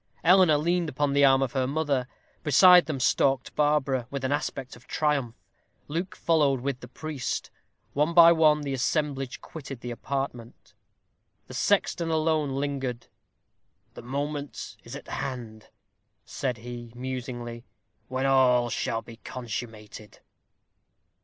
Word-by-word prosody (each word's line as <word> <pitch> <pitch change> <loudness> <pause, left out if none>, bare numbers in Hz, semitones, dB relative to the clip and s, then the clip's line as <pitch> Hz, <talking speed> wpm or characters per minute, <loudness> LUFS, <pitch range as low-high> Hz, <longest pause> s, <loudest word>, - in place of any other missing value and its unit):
Eleanor 180 -3 +6
leaned 170 +2 0
upon 145 +1 0
the 140 0 +4
arm 135 -1 +5
of 130 - -2
her 130 -1 0
mother. 140 -3 0 0.3
Beside 180 +4 +7
them 150 -4 -3
stalked 135 0 +1
Barbara, 145 -4 +1
with 140 -1 -5
an 130 - -1
aspect 135 -2 -3
of 120 - -18
triumph. 140 -6 0 0.5
Luke 175 +7 -3
followed 145 -6 +2
with 135 -1 -2
the 125 - -10
priest. 150 +1 -4 0.4
One 150 +4 +1
by 170 -1 +9
one 155 -2 +4
the 140 -2 -3
assemblage 135 0 -1
quitted 135 -6 -9
the 120 - -5
apartment. 125 -2 -5 0.7
The - - -11
sexton 170 -1 +1
alone 155 -3 +1
lingered. 135 -4 -3 0.8
"The - - -10
moment 145 +3 -4
is - - -9
at - - -10
hand," 115 -5 -6 0.6
said 125 -3 -3
he, 120 0 -8
musingly, 120 -2 -5 0.4
"when 130 +1 -2
all 125 -3 +4
shall 115 0 -2
be 115 - -12
consummated." 110 -4 -7
135 Hz, 135 wpm, -27 LUFS, 125-150 Hz, 0.8 s, by